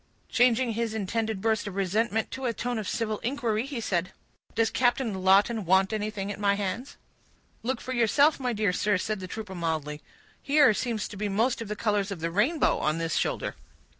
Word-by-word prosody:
Changing 245 Hz, 0 st, +3 dB
his 225 Hz, 0 st, -2 dB
intended 220 Hz, 0 st, -2 dB
burst 220 Hz, -1 st, 0 dB
of 195 Hz, -, -6 dB
resentment 215 Hz, +4 st, 0 dB
to 265 Hz, 0 st, -5 dB
a 235 Hz, -, 0 dB
tone 245 Hz, 0 st, -2 dB
of 205 Hz, -, -4 dB
civil 215 Hz, -2 st, -2 dB
inquiry, 235 Hz, -2 st, -1 dB
he 275 Hz, -4 st, -4 dB
said,— 180 Hz, -4 st, -1 dB, 0.4 s
"Does 225 Hz, 0 st, +2 dB
Captain 245 Hz, -2 st, +1 dB
Lawton 195 Hz, +4 st, +3 dB
want 190 Hz, +3 st, +3 dB
anything 210 Hz, -2 st, -3 dB
at 205 Hz, -, -7 dB
my 200 Hz, -1 st, +2 dB
hands?" 205 Hz, +7 st, -4 dB, 0.6 s
"Look 250 Hz, +1 st, -2 dB
for 255 Hz, -, -5 dB
yourself, 255 Hz, +6 st, +3 dB
my 250 Hz, -2 st, -1 dB
dear 210 Hz, -4 st, +1 dB
sir," 205 Hz, +2 st, +1 dB
said 210 Hz, +2 st, -2 dB
the 185 Hz, -, -6 dB
trooper 210 Hz, 0 st, -6 dB
mildly. 155 Hz, -4 st, -3 dB, 0.4 s
"Here 285 Hz, -5 st, +5 dB
seem 235 Hz, +1 st, -2 dB
to 205 Hz, -, -5 dB
be 205 Hz, +1 st, -2 dB
most 230 Hz, +5 st, +1 dB
of 225 Hz, -, -5 dB
the 210 Hz, -, -3 dB
colors 205 Hz, -2 st, 0 dB
of 195 Hz, -4 st, -5 dB
the 165 Hz, +1 st, -2 dB
rainbow, 255 Hz, -, +2 dB
on 155 Hz, +1 st, 0 dB
this 165 Hz, -1 st, -1 dB
shoulder." -, -, -1 dB
215 Hz, 195 wpm, -27 LUFS, 195-235 Hz, 0.6 s, Here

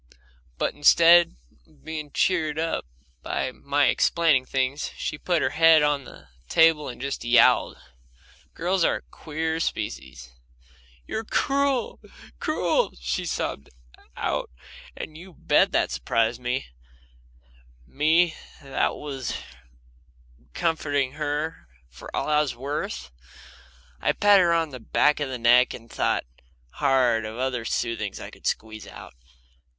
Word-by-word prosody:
But -, -, -1 dB
instead 170 Hz, -, +6 dB, 0.3 s
of -, -, -26 dB
being 155 Hz, -2 st, -5 dB
cheered 155 Hz, -4 st, +1 dB
up 165 Hz, -, -2 dB, 0.3 s
by 130 Hz, -, -2 dB
my 140 Hz, +2 st, 0 dB
explaining 150 Hz, 0 st, +3 dB
things, 135 Hz, +2 st, -1 dB
she 150 Hz, -, -4 dB
put 175 Hz, -3 st, 0 dB
her 130 Hz, -, 0 dB
head 160 Hz, -1 st, +6 dB
on 145 Hz, -2 st, +1 dB
the -, -, -14 dB, 0.2 s
table 160 Hz, -2 st, +4 dB
and 120 Hz, -, -9 dB
just 140 Hz, +2 st, -4 dB
yowled. 120 Hz, 0 st, +4 dB, 0.8 s
Girls 180 Hz, +2 st, 0 dB
are -, -, +3 dB
a -, -, -6 dB
queer 160 Hz, +1 st, -4 dB
species. 65 Hz, -, -4 dB, 0.7 s
"You're 220 Hz, -, -4 dB
cruel, 275 Hz, +1 st, 0 dB, 0.4 s
cruel!" -, -, 0 dB
she 60 Hz, 0 st, -2 dB
sobbed 70 Hz, -, -3 dB, 0.5 s
out, -, -, -2 dB, 0.5 s
and 155 Hz, -, -7 dB
you 180 Hz, -1 st, -13 dB
bet -, -, +3 dB
that -, -, +1 dB
surprised 115 Hz, -, 0 dB
me 125 Hz, +2 st, -2 dB, 1.2 s
me 160 Hz, -, +2 dB, 0.3 s
that 135 Hz, -1 st, -1 dB
was 135 Hz, -4 st, -5 dB, 1.2 s
comforting 145 Hz, -5 st, 0 dB
her 150 Hz, -, -4 dB, 0.2 s
for -, -, -12 dB
all -, -, -1 dB
I 150 Hz, 0 st, +3 dB
was 140 Hz, -5 st, -2 dB
worth! 120 Hz, -, -5 dB, 0.9 s
I -, -, +2 dB
patted 205 Hz, -1 st, +5 dB
her 170 Hz, -1 st, +3 dB
on 165 Hz, -2 st, 0 dB
the 130 Hz, -, -8 dB
back 150 Hz, +6 st, +2 dB
of 145 Hz, -2 st, -2 dB
the 130 Hz, -, -4 dB
neck, 120 Hz, +1 st, +4 dB
and 115 Hz, -1 st, -14 dB
thought -, -, 0 dB, 0.5 s
hard 130 Hz, -5 st, +2 dB
what 110 Hz, 0 st, -6 dB
other 125 Hz, -2 st, -2 dB
soothings 115 Hz, -4 st, -2 dB
I -, -, -8 dB
could -, -, -8 dB
squeeze 110 Hz, -1 st, -3 dB
out. -, -, -11 dB
145 Hz, 135 wpm, -25 LUFS, 125-160 Hz, 1.2 s, instead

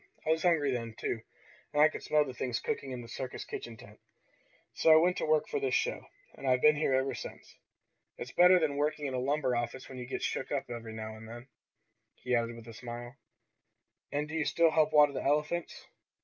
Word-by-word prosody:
I 155 Hz, -, +2 dB
was 160 Hz, 0 st, +2 dB
hungry 160 Hz, -5 st, +3 dB
then, 115 Hz, -3 st, -4 dB
too, 115 Hz, -, -3 dB, 0.5 s
and 145 Hz, -, -1 dB
I 150 Hz, -, +8 dB
could 155 Hz, -, -6 dB
smell 150 Hz, -1 st, +2 dB
the 130 Hz, -, -6 dB
things 125 Hz, -1 st, -2 dB
cooking 215 Hz, -12 st, -3 dB
in 125 Hz, -2 st, -5 dB
the -, -, -11 dB
circus 130 Hz, +2 st, -6 dB
kitchen 115 Hz, -1 st, -7 dB
tent. 105 Hz, 0 st, -15 dB, 0.7 s
So 160 Hz, -, +4 dB
I -, -, +9 dB
went 175 Hz, +3 st, +4 dB
to -, -, -2 dB
work 155 Hz, -1 st, +3 dB
for 440 Hz, -, -2 dB
this 410 Hz, 0 st, 0 dB
show, -, -, -1 dB, 0.3 s
and 135 Hz, -, -7 dB
I've 125 Hz, -1 st, +2 dB
been 150 Hz, 0 st, +7 dB
here 140 Hz, -3 st, +2 dB
ever 130 Hz, +1 st, 0 dB
since. -, -, -9 dB, 0.6 s
It's 125 Hz, -, -7 dB
better 180 Hz, +1 st, +7 dB
than 150 Hz, -4 st, 0 dB
working 150 Hz, 0 st, 0 dB
in 135 Hz, -, -3 dB
a 130 Hz, -, -1 dB
lumber 135 Hz, -1 st, 0 dB
office 120 Hz, +2 st, -3 dB
when 130 Hz, -1 st, -9 dB
you 125 Hz, -, -6 dB
get -, -, -4 dB
shook -, -, -2 dB
up 135 Hz, -3 st, -2 dB
every 115 Hz, -2 st, -6 dB
now 110 Hz, 0 st, -6 dB
and 110 Hz, +1 st, -11 dB
then," 120 Hz, +3 st, -10 dB, 0.7 s
he 125 Hz, -, -4 dB
added 115 Hz, 0 st, 0 dB
with 115 Hz, 0 st, -12 dB
a 115 Hz, -, -9 dB
smile. 120 Hz, +2 st, -8 dB, 1.0 s
"And 145 Hz, +1 st, -1 dB
do 150 Hz, -, -9 dB
you 160 Hz, -2 st, 0 dB
still 165 Hz, -1 st, +3 dB
help 155 Hz, -1 st, +3 dB
water 150 Hz, -2 st, +6 dB
the -, -, -3 dB
elephants?" 150 Hz, +4 st, -1 dB
135 Hz, 225 wpm, -31 LUFS, 120-155 Hz, 1.0 s, I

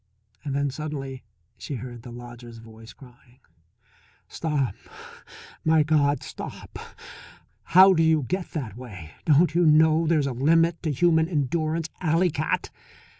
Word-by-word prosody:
Then 140 Hz, 0 st, -1 dB
suddenly 135 Hz, -3 st, -6 dB, 0.4 s
she 145 Hz, -, -6 dB
heard 120 Hz, -1 st, -8 dB
the 120 Hz, -, -11 dB
lodger's 120 Hz, -1 st, -11 dB
voice 115 Hz, 0 st, -13 dB
crying: 125 Hz, -1 st, -19 dB, 0.9 s
"Stop 150 Hz, -6 st, -2 dB, 0.9 s
my 160 Hz, -1 st, +4 dB
God, 145 Hz, -2 st, +1 dB
stop! -, -, -9 dB, 0.9 s
How 190 Hz, +2 st, +7 dB
do 165 Hz, -, +2 dB
you 160 Hz, -2 st, +3 dB
get 180 Hz, +7 st, -3 dB
that 130 Hz, -, -5 dB
way? 100 Hz, -11 st, -10 dB
Don't 160 Hz, +2 st, +4 dB
you 175 Hz, +1 st, +3 dB
know 160 Hz, +1 st, +4 dB
there's 155 Hz, -3 st, +2 dB
a 140 Hz, -, -2 dB
limit 165 Hz, +6 st, +2 dB
to 155 Hz, -, -1 dB
human 160 Hz, +2 st, +2 dB
endurance, 155 Hz, +1 st, -1 dB
alley 170 Hz, +1 st, +2 dB
cat?" 155 Hz, +1 st, -2 dB
150 Hz, 130 wpm, -25 LUFS, 125-160 Hz, 0.9 s, How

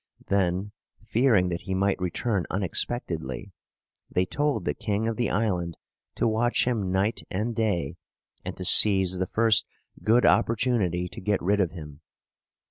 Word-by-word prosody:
Then, 95 Hz, +1 st, 0 dB, 0.3 s
fearing 110 Hz, -4 st, +2 dB
that 85 Hz, -1 st, -3 dB
he 95 Hz, -1 st, -4 dB
might 95 Hz, 0 st, 0 dB
return 90 Hz, +2 st, -1 dB
unexpectedly, 90 Hz, -, -3 dB, 0.6 s
they 90 Hz, -, +1 dB
told 145 Hz, -3 st, -1 dB
the 75 Hz, -, 0 dB
king 105 Hz, +5 st, -2 dB
of 115 Hz, -, -1 dB
the 120 Hz, 0 st, -1 dB
island 90 Hz, -5 st, -1 dB, 0.4 s
to -, -, +1 dB
watch 115 Hz, +2 st, +1 dB
him 110 Hz, -7 st, -1 dB
night 95 Hz, +4 st, 0 dB
and 110 Hz, +5 st, -2 dB
day, 100 Hz, -10 st, -1 dB, 0.5 s
and -, -, -6 dB
to -, -, -4 dB
seize 95 Hz, -3 st, +5 dB
the 95 Hz, -, -1 dB
first 110 Hz, +1 st, +3 dB, 0.4 s
good 115 Hz, +3 st, +4 dB
opportunity 105 Hz, -7 st, +1 dB
to -, -, -10 dB
get 105 Hz, +1 st, 0 dB
rid 100 Hz, +4 st, +1 dB
of 95 Hz, -4 st, +2 dB
him. 75 Hz, -3 st, -10 dB
100 Hz, 150 wpm, -26 LUFS, 90-115 Hz, 0.6 s, seize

